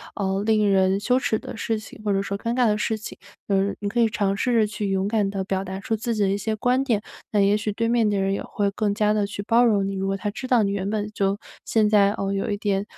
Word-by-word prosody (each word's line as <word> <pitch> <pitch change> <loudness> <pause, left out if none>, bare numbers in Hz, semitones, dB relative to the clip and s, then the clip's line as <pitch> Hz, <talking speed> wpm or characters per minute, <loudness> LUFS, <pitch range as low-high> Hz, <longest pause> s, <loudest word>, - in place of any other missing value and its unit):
呃， 195 -1 -1
令 215 -1 +3
人 190 0 +3
羞 250 +5 +2
耻 220 - 0
的 - - -8
事 225 0 -1
情， 215 - -12
或 210 - 0
者 195 0 +1
说 200 - -3
尴 230 +4 -2
尬 250 -1 +3
的 210 - +2
事 220 +1 -1
情。 215 - -8 0.3
呃， 195 0 +2
你 205 - -2
可 235 +4 -1
以 230 - +4
尝 200 -2 0
试 250 +5 0
着 220 -2 +4
去 210 -1 -3
勇 195 0 0
敢 210 -2 +1
地 195 -1 -3
表 190 0 -2
达 190 0 -6
出 225 +2 -2
自 230 +2 -2
己 210 - +1
的 195 - +2
一 195 - +1
些 220 +2 -2
观 250 +4 +1
点， 225 -6 0 0.3
那 210 - +2
也 200 +1 +4
许 210 0 -2
对 230 +3 -1
面 230 -2 +2
的 205 -1 0
人 195 0 +1
也 - - -2
会 200 -1 -1
更 205 0 -1
加 210 -1 +2
地 210 -1 0
去 200 0 -6
包 230 +3 +4
容 205 -5 +3
你， 195 - -3
如 195 0 -2
果 195 0 -1
他 205 +2 -3
知 255 +5 -6
道 245 -3 +4
你 200 - 0
原 200 0 -2
本 210 -1 -1
就 195 -1 0 0.3
现 215 -2 +2
在， 205 -1 +4
哦， 195 -1 -2
有 195 +1 -2
一 205 - -1
点， 200 -1 0
205 Hz, 315 characters per minute, -24 LUFS, 195-220 Hz, 0.3 s, 以